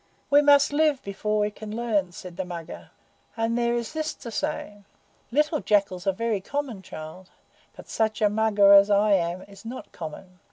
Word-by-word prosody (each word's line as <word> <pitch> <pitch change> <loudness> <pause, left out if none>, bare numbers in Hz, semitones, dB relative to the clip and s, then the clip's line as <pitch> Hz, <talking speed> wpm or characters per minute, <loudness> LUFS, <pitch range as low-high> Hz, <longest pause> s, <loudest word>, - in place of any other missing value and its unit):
"We 290 +1 +7
must 285 0 +5
live 300 -2 +2
before 210 +2 -2
we 210 0 +1
can 215 0 -8
learn," 215 -6 0
said 180 0 -10
the 190 - -3
Mugger, 170 -2 -8 0.5
"and 225 +1 0
there 240 0 +1
is 235 +3 -4
this 315 -1 -3
to 235 - -9
say: 205 -1 -4 0.5
Little 300 +4 +1
jackals 200 -4 0
are - - +5
very 220 0 -2
common, 270 -3 -4
child, 170 +1 -10 0.5
but - - -13
such 220 0 -1
a 215 - +4
mugger 205 -1 +4
as 200 +1 +7
I 205 +1 +3
am 175 0 0
is 200 -1 -15
not 235 +3 -8
common. 180 +3 -9
210 Hz, 185 wpm, -25 LUFS, 190-235 Hz, 0.5 s, We